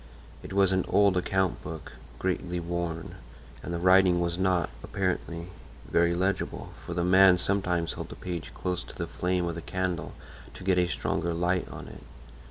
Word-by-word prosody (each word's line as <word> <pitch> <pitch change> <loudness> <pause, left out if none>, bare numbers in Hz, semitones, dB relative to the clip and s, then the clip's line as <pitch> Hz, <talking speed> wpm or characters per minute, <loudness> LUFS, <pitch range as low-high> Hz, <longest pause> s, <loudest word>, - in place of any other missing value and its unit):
It - - -9
was 95 -1 +3
an 95 -1 +2
old 100 -2 +4
account 95 0 +1
book, 80 -2 -7 0.3
greatly 90 -1 -1
worn; 85 -1 -4 0.4
and - - -6
the 85 - -1
writing 90 0 +5
was 85 -1 0
not, 90 -3 +2
apparently, 90 -3 -2 0.4
very 85 0 +3
legible, 95 +3 -1
for 85 - -5
the 90 - +1
man 95 0 +7
sometimes 90 -3 +1
held - - -6
the - - -8
page 85 -3 -5
close 90 -1 -2
to - - -11
the 85 - -3
flame 90 +1 -1
of 85 - -2
the 85 - -6
candle 95 0 -2 0.4
to - - -9
get 90 -1 +3
a 90 - +3
stronger 85 -1 -1
light 90 +2 0
on - - -8
it. - - -11
90 Hz, 180 wpm, -28 LUFS, 85-95 Hz, 0.4 s, man